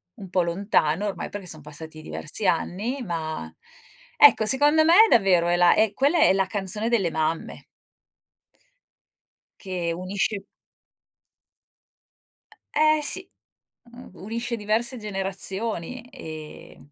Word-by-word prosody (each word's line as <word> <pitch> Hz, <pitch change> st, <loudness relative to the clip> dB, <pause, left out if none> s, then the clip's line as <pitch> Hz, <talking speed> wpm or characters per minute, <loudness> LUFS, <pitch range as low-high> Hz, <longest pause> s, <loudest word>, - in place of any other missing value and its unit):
Un 200 Hz, -6 st, -11 dB
po' 185 Hz, 0 st, +1 dB
lontano 170 Hz, -1 st, 0 dB
ormai, 195 Hz, -, -5 dB
perché 200 Hz, -2 st, -8 dB
son 155 Hz, -3 st, -7 dB
passati 155 Hz, +2 st, -11 dB
diversi 155 Hz, +6 st, -5 dB
anni, 205 Hz, +9 st, -1 dB
ma, 160 Hz, -, -5 dB, 0.7 s
ecco 430 Hz, -, +6 dB
secondo 290 Hz, +6 st, +5 dB
me 330 Hz, -, +5 dB, 0.2 s
davvero 185 Hz, -6 st, +3 dB
è 175 Hz, -, +2 dB
la 175 Hz, 0 st, +5 dB, 0.2 s
quella 280 Hz, +9 st, +1 dB
è -, -, +5 dB
la 195 Hz, 0 st, 0 dB
canzone 205 Hz, +3 st, -3 dB
delle 210 Hz, -7 st, +1 dB
mamme. 160 Hz, +1 st, -3 dB, 2.0 s
Che 180 Hz, -3 st, -3 dB
unisce 190 Hz, +4 st, -2 dB, 2.3 s
E-eh 310 Hz, +1 st, +3 dB
sì, 375 Hz, +5 st, -3 dB, 0.6 s
mhmm, 245 Hz, +1 st, -13 dB
unisce 230 Hz, +6 st, -5 dB
diverse 230 Hz, +4 st, -1 dB
generazioni, 195 Hz, +1 st, -2 dB
e 155 Hz, -, -10 dB
195 Hz, 110 wpm, -24 LUFS, 170-235 Hz, 2.3 s, ecco